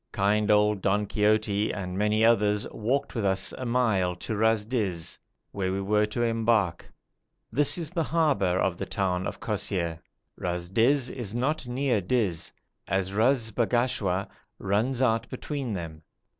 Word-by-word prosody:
Kind 105 Hz, +1 st, +1 dB
old 105 Hz, -1 st, +3 dB
Don 100 Hz, +2 st, +1 dB
Quixote 105 Hz, 0 st, +1 dB
and 90 Hz, -3 st, -5 dB
many 105 Hz, +2 st, +2 dB
others 105 Hz, -2 st, +3 dB
walked 135 Hz, +6 st, -1 dB
with 115 Hz, -, -2 dB
us 95 Hz, 0 st, 0 dB
a 130 Hz, -, -5 dB
mile 110 Hz, -7 st, +1 dB
to 110 Hz, +5 st, -5 dB
Ras 110 Hz, 0 st, +2 dB
Dis, 100 Hz, -9 st, -2 dB, 0.3 s
where 95 Hz, -2 st, -2 dB
we 95 Hz, -, -1 dB
were 105 Hz, +2 st, +2 dB
to 120 Hz, +3 st, -2 dB
embark; 115 Hz, -5 st, +1 dB, 0.6 s
this 145 Hz, +4 st, +4 dB
is 165 Hz, -3 st, -4 dB
the 175 Hz, -2 st, -1 dB
harbour 140 Hz, -, +1 dB
of 95 Hz, -2 st, 0 dB
the -, -, -4 dB
town 95 Hz, -2 st, -1 dB
of -, -, -6 dB
Kosseir. 85 Hz, -4 st, -2 dB, 0.4 s
Ras 90 Hz, 0 st, -3 dB
Dis 125 Hz, +5 st, +3 dB
is 115 Hz, -4 st, -5 dB
not 140 Hz, +3 st, -1 dB
near 125 Hz, -3 st, 0 dB
Dis, 95 Hz, -5 st, 0 dB, 0.4 s
as 95 Hz, 0 st, -1 dB
Ras 115 Hz, +2 st, +2 dB
Bagashwa 115 Hz, -5 st, 0 dB, 0.3 s
runs 115 Hz, +7 st, 0 dB
out 115 Hz, -1 st, +1 dB
between 135 Hz, -1 st, -4 dB
them. 80 Hz, -4 st, -6 dB
105 Hz, 155 wpm, -27 LUFS, 95-120 Hz, 0.6 s, this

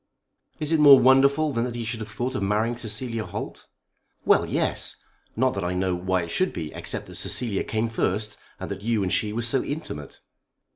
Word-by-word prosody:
"Is 150 Hz, 0 st, 0 dB
it 160 Hz, -, +3 dB
more 145 Hz, -2 st, +9 dB
wonderful 140 Hz, +4 st, +4 dB
than 115 Hz, -3 st, -1 dB
that 120 Hz, -1 st, -5 dB
he 120 Hz, -1 st, -4 dB
should 115 Hz, 0 st, -4 dB
have 110 Hz, 0 st, -6 dB
thought 120 Hz, +3 st, -3 dB
of 130 Hz, -, -3 dB
marrying 105 Hz, +4 st, 0 dB
Cecilia 115 Hz, 0 st, -2 dB
Holt?" -, -, -7 dB, 0.6 s
"Well, -, -, +3 dB
yes. -, -, 0 dB, 0.4 s
Not 130 Hz, +3 st, +2 dB
that 100 Hz, -, -3 dB
I 90 Hz, +1 st, -2 dB
know 90 Hz, 0 st, 0 dB
why 90 Hz, +1 st, -1 dB
it 85 Hz, -, -7 dB
should 185 Hz, 0 st, 0 dB
be, 80 Hz, -2 st, -6 dB
except -, -, -3 dB
that -, -, -12 dB
Cecilia 115 Hz, -6 st, +1 dB
came 110 Hz, +1 st, -1 dB
first, 105 Hz, -1 st, -1 dB, 0.2 s
and -, -, -6 dB
that 100 Hz, 0 st, -5 dB
you 110 Hz, -1 st, 0 dB
and 90 Hz, -, -1 dB
she 105 Hz, -2 st, 0 dB
were 115 Hz, +2 st, -3 dB
so 125 Hz, +3 st, +3 dB
intimate." 105 Hz, -, -6 dB
115 Hz, 205 wpm, -25 LUFS, 100-130 Hz, 0.6 s, more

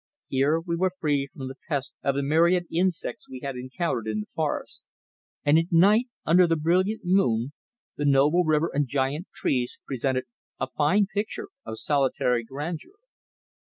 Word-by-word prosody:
Here 140 Hz, +4 st, +2 dB
we 170 Hz, 0 st, -3 dB
were 185 Hz, +1 st, +1 dB
free 145 Hz, -4 st, 0 dB
from 135 Hz, -2 st, -7 dB
the 135 Hz, +1 st, -8 dB
pest 140 Hz, -4 st, -2 dB
of 140 Hz, -, 0 dB
the 140 Hz, -, 0 dB
myriad 170 Hz, +5 st, +3 dB
insects 180 Hz, +5 st, -1 dB
we 130 Hz, -1 st, -8 dB
had 140 Hz, -2 st, -3 dB
encountered 130 Hz, -, -3 dB
in 105 Hz, -1 st, -1 dB
the -, -, -7 dB
forest; -, -, -3 dB, 0.6 s
and 145 Hz, +2 st, +6 dB
at 165 Hz, +3 st, -3 dB
night, 205 Hz, +8 st, +5 dB, 0.2 s
under 175 Hz, +2 st, +5 dB
the 165 Hz, -, +2 dB
brilliant 185 Hz, +7 st, +1 dB
moon, 140 Hz, -, +2 dB, 0.4 s
the 145 Hz, -, -1 dB
noble 145 Hz, +5 st, +4 dB
river 155 Hz, 0 st, +1 dB
and 145 Hz, 0 st, +1 dB
giant 140 Hz, +6 st, -1 dB
trees 125 Hz, -2 st, -1 dB
presented 130 Hz, -1 st, -1 dB, 0.4 s
a -, -, 0 dB
fine 185 Hz, +8 st, +3 dB
picture 215 Hz, -, -4 dB, 0.2 s
of 110 Hz, -, -5 dB
solitary 130 Hz, -4 st, +1 dB
grandeur. 150 Hz, -, -6 dB
150 Hz, 160 wpm, -26 LUFS, 135-175 Hz, 0.6 s, and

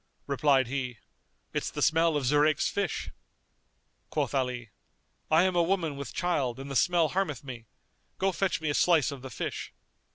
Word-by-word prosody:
Replied 140 Hz, -1 st, +3 dB
he, 125 Hz, -1 st, -3 dB, 0.6 s
"It's -, -, -1 dB
the -, -, -2 dB
smell 165 Hz, -1 st, +3 dB
of 140 Hz, -, -2 dB
Zurayk's 150 Hz, +3 st, +3 dB
fish." 195 Hz, -6 st, -2 dB, 1.0 s
Quoth -, -, -1 dB
Ali, 125 Hz, -4 st, -2 dB, 0.6 s
"I 160 Hz, +2 st, +5 dB
am 185 Hz, -1 st, +1 dB
a 175 Hz, -, +4 dB
woman 170 Hz, -4 st, 0 dB
with 140 Hz, -4 st, -6 dB
child 140 Hz, -8 st, -1 dB
and 135 Hz, +1 st, -7 dB
the -, -, -4 dB
smell 170 Hz, +1 st, +3 dB
harmeth 180 Hz, -9 st, -1 dB
me; 120 Hz, -4 st, -8 dB, 0.5 s
go, 195 Hz, 0 st, +1 dB
fetch 190 Hz, -1 st, 0 dB
me 155 Hz, -2 st, 0 dB
a -, -, -1 dB
slice 160 Hz, -3 st, +3 dB
of 140 Hz, -2 st, -8 dB
the 130 Hz, -, -7 dB
fish." 115 Hz, -, -5 dB
145 Hz, 170 wpm, -29 LUFS, 130-170 Hz, 1.0 s, I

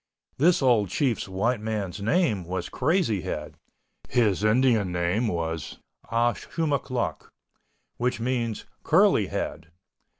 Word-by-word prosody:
This 170 Hz, +1 st, +4 dB
old 115 Hz, -7 st, +3 dB
Chief's 125 Hz, -, 0 dB
white 110 Hz, +6 st, 0 dB
man's 105 Hz, -3 st, -3 dB
name 110 Hz, -, +1 dB
was 90 Hz, +2 st, -4 dB
Crazy 140 Hz, -, +1 dB
Head—his 95 Hz, +5 st, -3 dB
Indian 110 Hz, -3 st, +3 dB
name 90 Hz, +7 st, 0 dB
was 80 Hz, -5 st, -3 dB, 0.3 s
Ah 120 Hz, +1 st, +2 dB
Shumoch 150 Hz, -5 st, -2 dB
Noch, 125 Hz, -2 st, -3 dB, 0.7 s
which 125 Hz, 0 st, -1 dB
means 120 Hz, -2 st, -2 dB, 0.2 s
"Curly -, -, +4 dB
Head." 80 Hz, 0 st, -4 dB
110 Hz, 110 wpm, -26 LUFS, 95-125 Hz, 0.7 s, This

